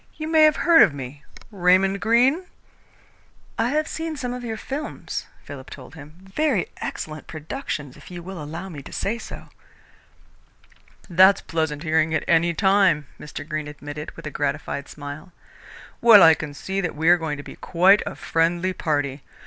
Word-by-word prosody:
You 310 - -5
may 315 -1 +6
have 305 -2 +4
heard 335 +2 +5
of 145 - +5
me 140 +1 -8 0.3
Raymond 190 +1 +3
Greene?" 255 +10 +3 1.1
"I 230 +2 +2
have 305 +3 0
seen 320 -1 -4
some 250 -2 -3
of 250 0 -6
your 225 -2 -4
films," 280 +7 -5 0.2
Philip 135 -2 -10
told 130 0 -11
him. 150 -1 -12
"Very 200 - 0
excellent 155 -1 -6
productions, 155 - -6
if - - -14
you 175 -1 -8
will 185 -2 -7
allow 165 +5 -6
me 155 -7 -8
to - - -12
say 230 +4 -2
so." - - -10 1.6
"That's 190 +2 +5
pleasant 160 -2 -2
hearing 160 0 +1
at - - 0
any 170 +1 +3
time," 190 -5 +3
Mr. 145 0 -8
Greene 155 -1 -3
admitted, 150 +1 -7
with - - -11
a 155 - -5
gratified 140 0 -3
smile. 145 +4 -9 0.7
"Well, 225 -4 +9
I 160 - +8
can 150 -2 -6
see 190 +6 -3
that 180 -4 -3
we 160 +2 -1
are 175 +1 +7
going 160 -3 -3
to 145 - -8
be - - -10
quite 190 +4 +4
a - - -6
friendly 170 +3 0
party. 145 -5 -2
170 Hz, 175 wpm, -23 LUFS, 150-205 Hz, 1.6 s, Well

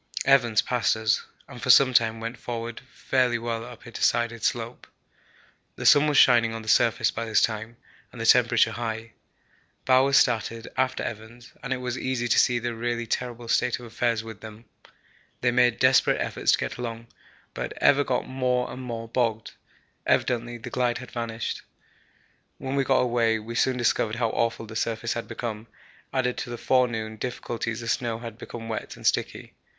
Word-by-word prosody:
Evans 120 -5 +4
passed 120 -4 +1
us, 110 -1 +1 0.2
and - - -11
for - - -4
some 130 -2 +7
time 115 -1 +3
went 115 +2 -6
forward 115 -1 -5
fairly 125 -2 +1
well 115 -1 -3
up 120 -1 -12
a 120 - -10
decided 120 0 0
slope. 120 0 -2 0.9
The - - -7
sun 145 +1 +6
was 145 -2 +2
shining 115 -2 +5
on 115 - -6
the - - -13
surface 115 +1 +3
by 115 - -4
this 110 - +2
time, 110 +1 -2 0.3
and - - -12
the - - -3
temperature - - +5
high. 115 -1 -5 0.7
Bowers 135 +2 +4
started 115 -1 +1
after 130 0 0
Evans, 115 +2 -8
and 125 - -6
it 130 - +1
was 125 0 -4
easy 125 -2 -1
to 120 - +4
see 125 - +3
the 120 0 -3
really 120 +1 -2
terrible 120 0 -4
state 125 +1 +1
of 120 - -10
affairs 115 -1 -1
with 110 -2 -10
them. 110 +1 -11 0.8
They 120 - +2
made 125 -1 +3
desperate 130 0 +4
efforts - - +1
to - - +4
get - - -4
along, 115 -1 -5 0.5
but - - -4
ever 145 0 +4
got 130 -2 -1
more 125 -1 -1
and 130 - -7
more 115 -2 -5
bogged 115 -2 -1 0.6
evidently 120 -1 0
the 115 - -9
glide 120 -2 0
had 125 -2 -10
vanished. 115 -1 -4 1.0
When 135 +1 -4
we 140 - +2
got 135 0 +3
away 120 -2 +2
we 110 +2 -7
soon 125 +2 +1
discovered 115 -2 +1
how 115 -2 0
awful 115 -1 -1
the 110 0 -10
surface 115 +1 -1
had 115 - -5
become; 110 -2 -5 0.4
added 125 -2 0
to - - -5
the 120 - -5
forenoon 115 -4 0
difficulties 120 -1 -4
the 115 - -7
snow 115 -1 -1
had 115 -1 -9
become 115 -2 -8
wet 110 - -5
and - - -12
sticky. - - -1
120 Hz, 185 wpm, -25 LUFS, 115-125 Hz, 1.0 s, some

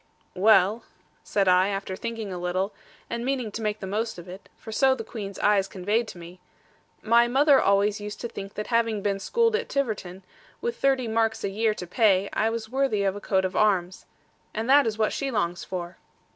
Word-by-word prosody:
'Well,' 200 +2 +4 0.4
said 200 -2 0
I, 185 +1 +5
after 195 -1 -3
thinking 225 -2 -5
a 180 - -5
little, 185 +3 -2 0.3
and 235 0 -4
meaning 255 -4 -2
to 225 - -6
make 210 0 -2
the - - -4
most 220 +3 -2
of 175 +1 -10
it, 185 +2 -11
for 220 - -10
so 265 +3 +3
the 225 - -6
Queen's 205 -3 -7
eyes 200 -2 +2
conveyed 205 +6 -1
to - - -9
me; 175 +1 -11 0.6
'my 235 +2 +4
mother 275 +3 +4
always 200 +1 +2
used 210 0 -7
to 235 - -3
think 195 -3 -8
that 210 - -4
having 225 -3 +1
been 200 -1 0
schooled 460 - +1
at 465 +1 -2
Tiverton, 205 -9 -3 0.4
with 475 0 -3
thirty 265 -3 +1
marks 225 0 0
a - - 0
year 215 +2 0
to 180 - -6
pay, 200 0 +2
I 220 - +1
was 225 -1 -4
worthy 260 -4 0
of 195 0 0
a 205 - -7
coat 190 -2 +1
of 185 - -3
arms. 185 -4 +1 0.5
And 220 +2 -2
that 280 -1 +5
is 220 -1 -2
what 215 -1 +1
she 275 - -2
longs 180 -7 -1
for.' 175 -1 -6
210 Hz, 210 wpm, -26 LUFS, 195-230 Hz, 0.6 s, I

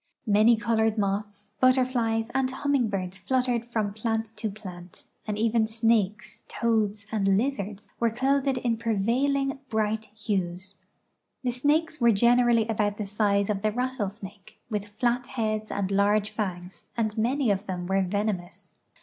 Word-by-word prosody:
Many 215 +2 +5
colored 225 -1 +1
moths, 205 0 -2
butterflies, 245 -3 +2
and 265 -1 +1
humming 265 -2 0
birds 190 -1 -3
fluttered 250 +1 0
from 215 -3 -1
plant 225 0 -2
to 215 0 -2
plant, 185 -4 -10 0.2
and 210 -1 -2
even 225 0 +2
snakes, 220 -2 0
toads, 215 -3 0
and 195 -3 +2
lizards 210 -5 -2
were 235 - +3
clothed 270 +3 +1
in 240 -2 0
])revailing 260 +6 +1
bright 220 0 0
hues. 195 -3 -3 0.6
The 250 - +1
snakes 300 +4 +1
were 235 0 +6
generally 235 +1 +4
about 210 -2 0
the 210 - -3
size 200 0 +1
of 205 -2 -1
the 215 0 +1
rattlesnake, 210 -4 -5
with 205 -1 -2
flat 240 +4 -1
heads 215 -3 -2
and 200 -1 -2
large 205 +1 +2
fangs, 180 -3 -5
and 215 -2 0
many 240 +2 +1
of 200 +1 -2
them 180 -2 -3
were 195 +2 +1
venomous. 190 -1 -3
220 Hz, 145 wpm, -27 LUFS, 200-235 Hz, 0.6 s, were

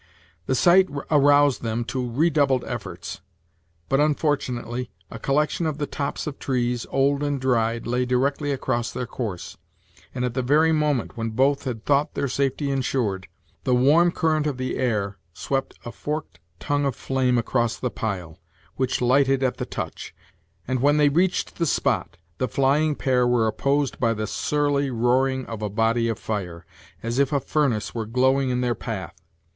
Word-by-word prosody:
The 130 - +1
sight 180 +6 +5 0.2
aroused 145 -2 +5
them 115 0 -2
to 125 -1 -3
redoubled 140 -2 +2
efforts; 105 -6 -6 0.7
but, 135 - +2
unfortunately, 130 -5 0 0.2
a - - -7
collection 150 +4 0
of 155 -2 -2
the 150 - -1
tops 140 0 -4
of 150 -2 -6
trees, 125 -2 -1
old 140 +1 +2
and 145 -1 -1
dried, 115 -3 0
lay 125 +1 0
directly 140 +3 0
across 120 -3 -1
their 125 - -4
course; 110 -7 -5 0.6
and 125 -1 -1
at 125 - -2
the 130 - 0
very 150 +6 +3
moment 150 -6 0
when 115 0 -2
both 135 +6 +1
had 115 -4 -4
thought 145 +1 +2
their 140 - 0
safety 140 +2 -1
insured, 125 -8 -1 0.4
the 125 - +2
warm 155 +8 +5
current 155 -3 +1
of 140 -4 -2
the 130 0 -2
air 105 -6 -1 0.2
swept 135 -1 -2
a 120 - -5
forked 145 - -5 0.2
tongue 145 0 0
of 135 -4 -1
flame 130 -2 0
across 120 0 0
the 125 - -3
pile, 90 -6 -4 0.4
which 130 -1 0
lighted 135 +2 +3
at 130 - 0
the - - -4
touch; - - -6 0.5
and 130 0 0
when 145 +2 +4
they 150 -1 +5
reached 175 +5 0
the 170 - +1
spot, 85 - 0 0.2
the 130 - +1
flying 145 +4 +2
pair 125 -3 +2
were 120 -2 +3
opposed 140 +6 0
by 115 -2 +2
the 110 0 -2
surly 145 +2 0
roaring 130 +2 +1
of 115 -2 -7
a 105 - -2
body 115 +2 +1
of 115 - -2
fire, 90 -6 -5 0.4
as 115 +3 -1
if 140 0 +2
a 145 - +2
furnace 135 -5 0
were 115 -2 -3
glowing 130 +3 +2
in 125 0 0
their 120 -1 +1
path. 95 -9 -6
130 Hz, 175 wpm, -24 LUFS, 120-145 Hz, 0.7 s, sight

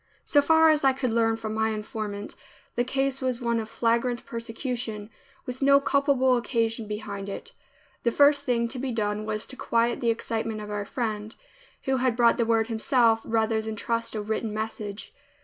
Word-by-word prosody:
So 290 - +4
far 320 +2 +5
as 300 -2 +1
I 270 -1 +5
could 255 -3 -2
learn 225 -1 +3
from 220 -1 -5
my 220 0 +1
informant, 210 -1 -5 0.4
the 245 - +2
case 270 +1 -1
was 255 -2 -1
one 235 -2 0
of 220 0 -5
flagrant 235 +1 0
persecution, 230 -2 -5 0.3
with 250 +1 -6
no 280 0 +6
culpable 275 -2 +3
occasion 230 -2 -1
behind 205 -2 -5
it. 455 - -7 0.5
The 235 - +2
first 285 +3 +5
thing 235 -2 0
to 255 - -7
be 265 0 -2
done 210 -1 -2
was 215 0 -2
to 260 - -11
quiet 235 -1 +1
the 235 - +1
excitement 225 -1 -2
of 210 0 -7
our 205 -1 -3
friend, 215 -2 -3 0.5
who 265 0 +1
had 255 -2 +1
brought 235 -1 +4
the 235 - +2
word 225 -1 +3
himself 225 0 +2
rather 220 0 +1
than 220 0 -5
trust 230 +1 -2
a 210 - -2
written 220 +1 -2
message. 215 -1 -5
230 Hz, 185 wpm, -26 LUFS, 220-255 Hz, 0.5 s, no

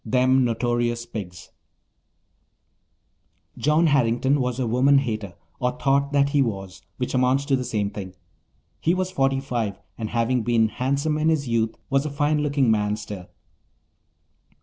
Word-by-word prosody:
Them 130 +2 +3
Notorious 120 0 0
PigsToC 95 -7 -8 2.1
John 150 +3 +2
Harrington 135 -1 +2
was 125 0 -2
a 130 - 0
woman 130 +5 +4
hater, 110 -8 -2 0.2
or 125 0 0
thought 140 0 +1
that 140 -1 +3
he 140 -1 +2
was, 95 -6 -3 0.2
which 125 - -3
amounts 130 +2 +2
to 140 -2 +2
the 130 - -2
same 105 -4 -2
thing. 95 -2 -7 0.6
He 170 +3 +1
was 185 0 -2
forty 135 -6 +1
five 120 -6 -3 0.2
and, 110 -2 -3
having 120 +1 +1
been 115 -1 +2
handsome 140 +6 -1
in 155 +1 +2
his 150 -4 0
youth, 115 -1 0 0.2
was 135 0 +3
a - - -3
fine 145 +1 +1
looking 140 -5 +2
man 105 -1 +1
still. 105 -4 -8
125 Hz, 150 wpm, -24 LUFS, 110-140 Hz, 2.1 s, woman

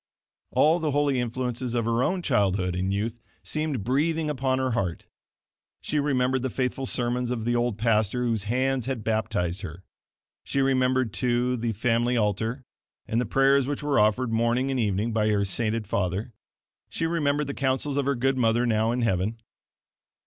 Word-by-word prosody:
All 160 +3 +3
the 160 -2 -1
holy 145 -2 +1
influences 125 0 -3
of 115 -2 0
her 115 +1 +1
own 180 +3 0
childhood 95 - +1
and 95 +1 -1
youth 110 +4 -2 0.2
seemed 155 -8 -2
breathing 150 +6 0
upon 130 -2 0
her 130 -1 0
heart. 100 -7 -2 0.7
She 150 - -1
remembered 130 -2 +1
the 130 - -1
faithful 130 +2 -2
sermons 125 0 -1
of 120 -3 -3
the 120 0 +1
old 120 -3 0
pastor 110 +1 +1
whose 115 -4 -1
hands 130 +2 0
had 130 -5 -3
baptized 100 -5 -1
her. 90 +1 -8 0.6
She 140 - -2
remembered, 130 -3 +2
too, 125 0 +1
the 115 -1 -2
family 120 +3 +1
altar, 110 +4 -1 0.4
and 115 +2 +1
the 125 - -2
prayers 135 0 +3
which 145 +1 -3
were 145 -5 +2
offered 110 +3 +2
morning 120 +4 +1
and 130 - -1
evening 105 +1 0
by 110 -1 +2
her 100 -1 +2
sainted 110 +3 -1
father. 100 +4 -2 0.6
She 165 - -2
remembered 150 -3 +1
the 140 - -4
counsels 135 +1 -1
of 140 -1 0
her 140 - +2
good 135 +2 +1
mother 115 +1 +2
now 110 -1 +2
in 125 +1 -1
heaven. 105 +1 0
120 Hz, 175 wpm, -26 LUFS, 110-135 Hz, 0.7 s, All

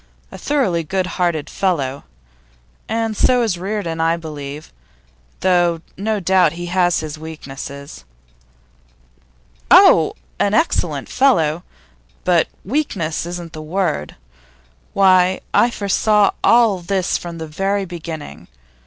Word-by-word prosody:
A - - -9
thoroughly 225 - 0
good 185 +4 -1
hearted 170 -4 -1
fellow. 145 -8 -2 0.8
And 225 0 -1
so 250 +3 +3
is 190 -7 -1
Reardon, 185 -4 -3
I 165 +1 +2
believe, 150 -2 -8 0.7
though 175 -3 +2
no 215 +2 -1
doubt 185 -3 +3
he 175 +1 -6
has 175 -2 +2
his 155 -1 -6
weaknesses.' 140 - -9 1.7
'Oh, - - +6 0.2
an 205 - +2
excellent 320 - 0
fellow! 170 - +2 0.6
But 175 -3 +3 0.2
weakness 195 - -2
isn't 175 -1 -7
the 155 - -7
word. 155 - -2 0.8
Why, 185 -1 +4
I 240 - +4
foresaw 210 -1 +2
all 230 -5 +4
this 185 +1 -1
from 170 -1 -7
the 160 - -5
very 195 +5 -1
beginning. 160 - -8
175 Hz, 115 wpm, -19 LUFS, 160-200 Hz, 1.7 s, Oh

